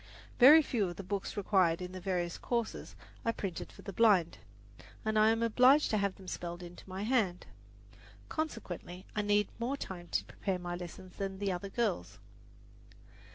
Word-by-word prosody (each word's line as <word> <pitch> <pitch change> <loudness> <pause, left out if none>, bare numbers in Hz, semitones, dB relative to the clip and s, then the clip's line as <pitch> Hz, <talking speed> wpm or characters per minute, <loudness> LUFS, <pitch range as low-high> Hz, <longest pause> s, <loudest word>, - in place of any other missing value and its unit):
Very 300 +6 +9
few 220 -8 0
of 175 - -7
the 195 - -7
books 200 +2 -4
required 185 -4 +3
in 180 0 -6
the 185 - -7
various 175 -2 -2
courses 235 -2 -3 0.3
are 230 - +2
printed 195 -6 -5
for - - -14
the 200 - -6
blind, 195 -6 +4 0.7
and 215 0 +2
I 215 +1 +6
am 225 +1 +2
obliged 255 +6 +5
to 215 - +2
have 200 -1 0
them 190 - -14
spelled 175 0 -5
into 175 +2 -11
my 190 +2 -4
hand. 215 -7 +1 0.8
Consequently 190 - -5
I 210 - +1
need 205 0 +2
more 255 +4 -1
time 175 -8 -7
to - - -1
prepare 190 -2 -3
my 175 -1 -4
lessons 180 +1 -9
than 195 -1 -3
other 185 +2 -4
girls. 200 - -1
195 Hz, 170 wpm, -32 LUFS, 180-225 Hz, 0.8 s, Very